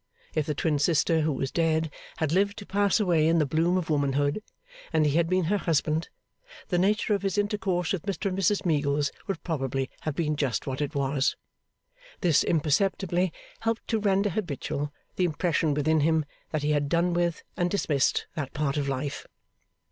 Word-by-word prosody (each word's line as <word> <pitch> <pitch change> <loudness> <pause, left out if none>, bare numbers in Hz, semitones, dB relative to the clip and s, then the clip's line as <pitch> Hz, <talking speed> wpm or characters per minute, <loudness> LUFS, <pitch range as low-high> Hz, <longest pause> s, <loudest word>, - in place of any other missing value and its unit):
If 155 -2 0
the 150 - -1
twin 150 0 +1
sister 160 +2 +3
who 155 0 +1
was 135 -1 -2
dead 160 -2 +1 0.3
had 155 -2 0
lived 200 +4 +2
to 205 - -8
pass 200 +2 +2
away 170 -6 +3
in 165 +1 +3
the 155 - +3
bloom 165 +5 +2
of 165 -3 -2
womanhood, 145 +4 +1 0.5
and 160 -2 +3
he 150 - +3
had 165 0 +2
been 185 0 +2
her 200 +5 +1
husband, 160 -1 0 0.6
the 175 - +2
nature 210 +3 +2
of 200 - 0
his 195 0 -1
intercourse 200 -4 0
with 190 - -2
Mr 200 +2 -4
and 190 -2 0
Mrs 195 +2 +2
Meagles 145 -3 +1 0.2
would 195 -5 -3
probably 135 -5 -2
have 155 -3 -3
been 150 -2 0
just 135 -8 -1
what 135 +1 -3
it 145 -1 -2
was. 140 0 +1 0.9
This 170 -6 +4
imperceptibly 175 +3 +1 0.3
helped 225 0 -2
to 225 - +1
render 200 0 +2
habitual 150 -5 -3 0.3
the 185 - +3
impression 160 -2 +1
within 155 +2 +2
him, 160 0 +2 0.2
that 155 -2 -2
he 150 - +1
had 145 -1 +1
done 170 +2 +2
with, 170 -1 0
and 175 -1 +1
dismissed 150 -8 +1
that 145 -4 -4
part 150 -1 0
of 140 -1 -1
life. 140 +1 -3
160 Hz, 185 wpm, -27 LUFS, 145-185 Hz, 0.9 s, This